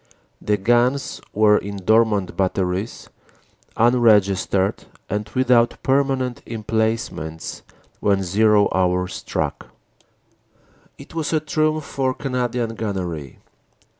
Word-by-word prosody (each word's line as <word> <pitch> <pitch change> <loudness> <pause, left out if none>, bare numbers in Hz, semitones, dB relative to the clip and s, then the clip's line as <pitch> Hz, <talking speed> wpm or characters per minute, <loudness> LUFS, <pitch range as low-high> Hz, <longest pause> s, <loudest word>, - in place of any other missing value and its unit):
The 105 0 +1
guns 120 +6 +1
were 105 0 +4
in 100 0 -6
dormant 105 -1 +2
batteries, 95 +2 -2 0.7
unregis 110 -5 +4
tered 95 0 0 0.3
and 105 +1 -2
without 125 -2 +3
permanent 135 -2 0
emplacements 110 -8 -3 0.4
when 100 -1 +1
"zero" 105 +2 +3
hour 90 -1 +1
struck. 95 - -4 1.3
It - - -13
was 165 -1 -2
a 155 - +3
triumph 155 0 0
for 130 -1 -1
Canadian 125 -3 -2
gunnery. 90 - -4
110 Hz, 100 wpm, -21 LUFS, 95-125 Hz, 1.3 s, were